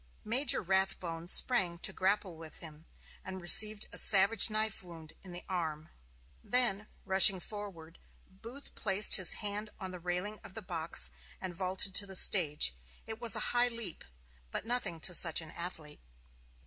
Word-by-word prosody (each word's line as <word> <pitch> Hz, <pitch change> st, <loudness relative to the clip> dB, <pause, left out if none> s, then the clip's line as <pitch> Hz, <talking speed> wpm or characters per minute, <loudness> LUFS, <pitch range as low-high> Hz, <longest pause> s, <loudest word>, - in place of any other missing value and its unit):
Major 245 Hz, +4 st, +3 dB
Rathbone 180 Hz, -3 st, -3 dB
sprang 185 Hz, -4 st, +3 dB
to -, -, -1 dB
grapple 190 Hz, -1 st, -3 dB
with 160 Hz, -1 st, -13 dB
him, 160 Hz, 0 st, -15 dB, 0.4 s
and 190 Hz, 0 st, -9 dB
received 210 Hz, +4 st, +6 dB
a -, -, +4 dB
savage 200 Hz, +2 st, +4 dB
knife 215 Hz, 0 st, -3 dB
wound 165 Hz, -3 st, -14 dB
in 185 Hz, -, -14 dB
the 175 Hz, 0 st, -9 dB
arm. 160 Hz, -4 st, -6 dB, 0.5 s
Then, 230 Hz, -4 st, 0 dB, 0.2 s
rushing 190 Hz, 0 st, +5 dB
forward, 180 Hz, -5 st, -11 dB, 0.3 s
Booth 230 Hz, +9 st, -13 dB
placed 205 Hz, 0 st, +1 dB
his 185 Hz, -3 st, +2 dB
hand 210 Hz, 0 st, -6 dB
on 190 Hz, -2 st, -8 dB
the 180 Hz, -, -10 dB
railing 180 Hz, +4 st, -6 dB
of 190 Hz, -, -15 dB
the 220 Hz, -, -9 dB
box 160 Hz, -, -2 dB, 0.3 s
and 185 Hz, -2 st, -8 dB
vaulted 185 Hz, +2 st, -2 dB
to 200 Hz, +2 st, +5 dB
the 190 Hz, -, -8 dB
stage. 150 Hz, -, +2 dB, 0.3 s
It 220 Hz, +1 st, -9 dB
was 235 Hz, -4 st, +6 dB
a -, -, 0 dB
high 245 Hz, 0 st, +2 dB
leap, 230 Hz, -7 st, -7 dB, 0.5 s
but 190 Hz, -, -7 dB
nothing 235 Hz, -8 st, -3 dB
to 180 Hz, -, 0 dB
such 165 Hz, -1 st, +1 dB
an 160 Hz, -2 st, -12 dB
athlete. 165 Hz, -4 st, -8 dB
190 Hz, 160 wpm, -30 LUFS, 170-210 Hz, 0.5 s, received